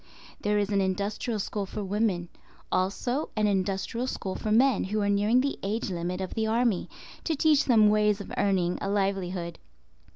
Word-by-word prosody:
There 210 0 +1
is 205 -1 0
an 200 -1 +2
industrial 200 +4 -1
school 200 0 -3
for 210 - -5
women; 195 -3 0 0.4
also 225 +10 0
an 215 -1 +2
industrial 195 +4 -1
school 190 -6 -4
for 215 - -3
men 250 +1 +4
who 210 +3 -1
are 200 - +1
nearing 210 +5 +3
the 280 +1 -2
age 205 +1 -2
limit 180 +1 -3
of 190 - -4
the 220 -1 -1
army, 230 -3 +1 0.3
to 320 - 0
teach 300 -1 +3
them 220 -5 +5
ways 210 0 +3
of 200 - -8
earning 185 -3 +1
a 195 - -2
livelihood. 190 -4 -1
205 Hz, 175 wpm, -27 LUFS, 190-220 Hz, 0.4 s, them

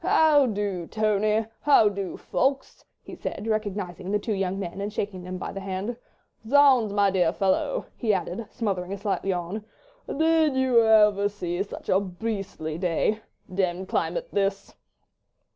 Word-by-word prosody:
"How 300 -4 +5
do, 200 -5 -2
Tony? 215 0 +1
How 280 -7 +5
do, 200 -2 -3
Ffoulkes?" 270 +1 -1 0.2
he - - -10
said, 200 - -5
recognising 205 -4 -3
the 210 - +2
two 210 +2 -3
young 190 -1 -1
men 190 0 -5
and 205 +1 -3
shaking 200 -3 -4
them 185 +1 -6
by - - -5
the 195 - -6
hand. 195 +4 -4 0.5
"Zounds, 265 -6 +5
my 200 -1 +3
dear 180 -3 +2
fellow," 195 - 0
he 225 -4 0
added, 190 +3 -2
smothering 195 -6 -3
a - - -4
slight 200 0 -2
yawn, 190 +2 -2 0.4
"did 320 -1 +2
you 260 -3 +4
ever 210 -2 +5
see 180 -3 -3
such 200 - -7
a 190 - +4
beastly 195 -5 -4
day? 185 +4 0 0.3
Demmed 185 0 -2
climate - - -1
this." 195 0 -1
200 Hz, 155 wpm, -26 LUFS, 185-220 Hz, 0.5 s, How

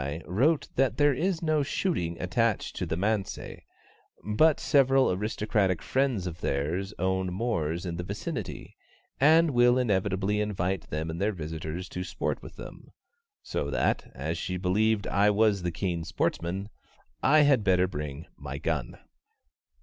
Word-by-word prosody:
wrote 140 - +2
that 135 0 +1
there 145 -1 +4
is 175 +4 -1
no 155 -2 +2
shooting 115 - -1
attached 110 +4 0
to - - -3
the 80 - -2
manse, 100 +1 0 1.0
but 155 +7 +4
several 135 -2 +4
aristocratic 100 -2 0
friends 130 -8 0
of 85 -2 -6
theirs 80 +8 -1
own 95 0 0
moors 90 -5 -1
in 85 -1 -4
the 90 - -3
vicinity, 100 +3 -5 0.4
and 160 +3 +5
will 120 0 +4
inevitably 100 -3 +1
invite 95 -3 -2
them 80 +2 -3
and 85 - -5
their 105 +2 +2
visitors 80 0 -5
to 90 - -5
sport - - -3
with - - -11
them, - - -11 0.5
so 70 - -3
that, - - 0
as 80 +5 -3
she 90 +1 -3
believed 100 +3 +1
I 100 +1 +3
was 105 -1 +3
the 90 0 -2
keen 85 -1 -2
sportsman, 95 +4 -2 0.5
I 155 +3 +5
had 140 -6 +4
better 90 -2 +3
bring 75 -1 -6
my 70 0 -6
gun. 75 -4 -2
95 Hz, 150 wpm, -28 LUFS, 85-120 Hz, 1.0 s, and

